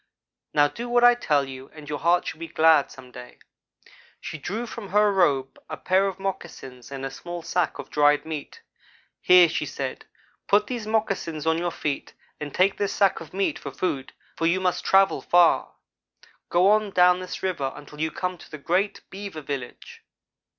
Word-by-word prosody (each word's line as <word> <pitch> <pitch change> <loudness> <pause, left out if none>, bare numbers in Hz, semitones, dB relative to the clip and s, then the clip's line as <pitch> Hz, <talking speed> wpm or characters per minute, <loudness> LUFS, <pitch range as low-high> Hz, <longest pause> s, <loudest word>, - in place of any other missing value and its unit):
"'Now 145 -1 +5
do 235 +10 -7
what 240 0 +3
I 245 0 +8
tell 145 - 0
you, 130 0 -9
and 155 -1 -11
your 145 -1 -4
heart 175 +1 +2
shall 160 - -6
be 165 - -6
glad 160 -2 +4
some 130 -2 -13
day.' 125 0 -12 0.8
She 160 - -7
drew 215 - -4
from 225 -4 -8
her 210 +1 +3
robe 140 -8 +1
a 155 - -5
pair 190 +2 +2
of 190 - -4
moccasins 145 -10 -6
and 135 -1 -5
a 135 - -4
small 175 +4 -7
sack 175 0 -1
of - - -9
dried 145 0 +3
meat. 160 - -7 0.6
'Here,' 180 -1 +7
she 160 - -3
said, - - -5 0.4
'put 205 +1 +4
these 235 -2 -5
moccasins 195 -8 -1
on 160 0 +2
your 175 0 -1
feet 150 -4 -4 0.2
and 150 -1 -6
take 190 +5 +2
this 200 -1 -1
sack 195 -1 +3
of 160 -2 -11
meat 195 +1 -1
for - - -6
food, 140 -8 -3 0.2
for 165 - 0
you 175 +3 +2
must 185 -1 -1
travel 195 0 +3
far. 175 -1 +3 0.7
Go 180 +3 +4
on 215 -1 +2
down 180 -1 +4
this 185 0 -7
river 155 -8 -1
until 150 +1 -11
you 160 - +1
come 180 +2 -4
to 155 - -11
a - - -7
great 180 +7 -1
beaver 195 -5 -7
village. 140 -4 -7
175 Hz, 190 wpm, -25 LUFS, 145-195 Hz, 0.8 s, I